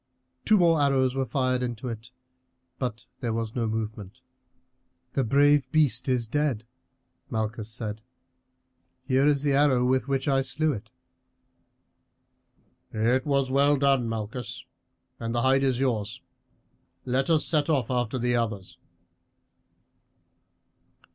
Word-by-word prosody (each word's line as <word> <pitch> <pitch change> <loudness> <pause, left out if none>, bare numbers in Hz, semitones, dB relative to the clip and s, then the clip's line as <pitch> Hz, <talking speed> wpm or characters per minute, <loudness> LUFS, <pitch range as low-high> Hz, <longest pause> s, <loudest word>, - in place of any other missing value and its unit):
Two 215 - +5
more 165 -4 +4
arrows 135 -2 +2
were 135 -1 -1
fired 130 0 0
into 120 0 -4
it, 115 0 -6 0.7
but 120 -2 -4
there 115 -2 -2
was 115 -1 -3
no 120 -2 0
movement. 110 +1 -5 0.9
"The 135 - +1
brave 140 +2 +3
beast 140 -5 +2
is 125 -2 +1
dead," 130 -2 -1 0.6
Malchus 110 0 -3
said. 110 -2 -5 1.0
"Here 135 +1 +2
is 145 -1 +2
the 145 -2 +2
arrow 135 -3 +3
with 130 +1 +1
which 135 0 -1
I 135 -1 +3
slew 145 +4 0
it." 105 - -8 2.0
"It 120 +5 +1
was 140 -2 +1
well 140 +2 +4
done, 135 -4 +2
Malchus, 115 +2 -5 0.5
and 115 0 -3
the 120 - +1
hide 135 +1 +3
is 130 -2 +1
yours. 115 -6 -1 0.9
Let 130 +4 0
us 160 -2 +3
set 155 -1 +1
off 135 -6 +1
after 125 0 -1
the 120 0 0
others." 110 -5 -3
130 Hz, 130 wpm, -26 LUFS, 115-140 Hz, 2.0 s, Two